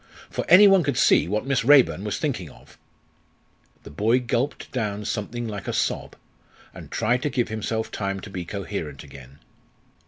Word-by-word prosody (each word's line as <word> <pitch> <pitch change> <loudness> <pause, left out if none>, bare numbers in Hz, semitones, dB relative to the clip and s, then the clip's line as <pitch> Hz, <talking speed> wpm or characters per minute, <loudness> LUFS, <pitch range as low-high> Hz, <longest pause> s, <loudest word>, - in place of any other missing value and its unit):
for - - -3
any 205 +3 +9
one 195 -2 +5
could 145 -6 -1
see - - +4
what 105 +5 -2
Miss 135 -3 0
Raeburn 120 - +5
was 105 -1 -3
thinking 120 - -3
of." - - -18 1.1
The - - -11
boy 110 - +2
gulped 125 +3 -2
down 105 -4 -3
something 115 +3 -4
like 105 -2 -6
a - - -2
sob, - - -2 0.6
and - - -11
tried 120 +3 0
to 150 - -1
give 125 -4 -1
himself 110 +1 -3
time 100 -1 -3
to 100 - -10
be 90 -2 -5
coherent 85 -6 -6
again. 70 -1 -14
110 Hz, 175 wpm, -24 LUFS, 100-125 Hz, 1.1 s, any